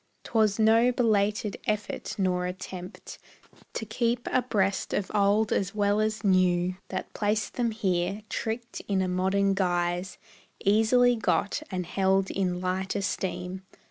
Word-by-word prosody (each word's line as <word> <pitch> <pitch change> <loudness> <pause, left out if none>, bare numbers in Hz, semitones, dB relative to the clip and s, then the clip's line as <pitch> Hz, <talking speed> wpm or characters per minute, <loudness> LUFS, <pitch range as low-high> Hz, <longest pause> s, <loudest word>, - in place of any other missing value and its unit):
'T - - -12
was 215 -3 +3
no 225 +2 +5
belated 210 -3 +1
effort 210 -1 -2
nor 180 -2 0
attempt 185 0 -8 0.5
To 220 - -4
keep 235 +2 -1
abreast 205 -6 0
with 200 - -2
old 205 +1 +3
as 200 +2 -1
well 205 0 +2
as 215 +1 -1
new 185 -2 +3
That 185 - -5
placed 210 +1 -1
them 240 -2 0
here, 195 -2 -1
tricked 230 +2 -4
in 195 -2 +1
a - - -1
modern 190 +2 +1
guise, 175 -1 -1 0.5
Easily 225 +4 +4
got, 225 +3 0
and 185 -2 -3
held 190 +2 +1
in 180 -2 -1
light 185 +1 -2
esteem. 190 -2 -3
200 Hz, 140 wpm, -27 LUFS, 185-220 Hz, 0.5 s, no